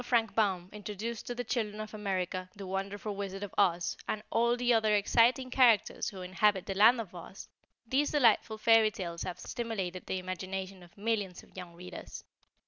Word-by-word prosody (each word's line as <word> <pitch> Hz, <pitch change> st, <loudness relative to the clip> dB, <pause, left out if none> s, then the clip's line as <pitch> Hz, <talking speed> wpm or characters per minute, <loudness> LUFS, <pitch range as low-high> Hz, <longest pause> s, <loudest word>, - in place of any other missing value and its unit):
Frank 230 Hz, -3 st, +1 dB
Baum 190 Hz, -5 st, +1 dB
introduced 210 Hz, +2 st, -5 dB
to 245 Hz, -, -3 dB
the 245 Hz, -, -3 dB
children 215 Hz, -3 st, -2 dB
of 215 Hz, 0 st, -6 dB
America, 185 Hz, -3 st, -2 dB
THE 200 Hz, -1 st, -8 dB
WONDERFUL 195 Hz, +2 st, -4 dB
WIZARD 195 Hz, 0 st, -5 dB
OF 205 Hz, -, -6 dB
OZ 175 Hz, -4 st, +2 dB
and 215 Hz, -, -2 dB
all 235 Hz, +1 st, +2 dB
the 245 Hz, 0 st, +3 dB
other 220 Hz, -2 st, +3 dB
exciting 240 Hz, +5 st, +3 dB
characters 245 Hz, -5 st, +4 dB
who 190 Hz, -2 st, -8 dB
inhabit 190 Hz, +1 st, +2 dB
the 195 Hz, -, -3 dB
land 220 Hz, +5 st, +6 dB
of 205 Hz, -6 st, -6 dB
Oz, 180 Hz, +2 st, -10 dB, 0.4 s
these 270 Hz, +5 st, +1 dB
delightful 230 Hz, -5 st, +3 dB
fairy 225 Hz, 0 st, +5 dB
tales 175 Hz, -5 st, -6 dB
have 180 Hz, -2 st, -4 dB
stimulated 195 Hz, -6 st, -4 dB
the -, -, -1 dB
imagination 185 Hz, +1 st, -5 dB
of 175 Hz, +1 st, -17 dB
millions 205 Hz, -4 st, -2 dB
of -, -, -21 dB
young 180 Hz, -2 st, -9 dB
readers. 180 Hz, +1 st, -9 dB
205 Hz, 180 wpm, -31 LUFS, 185-225 Hz, 0.4 s, land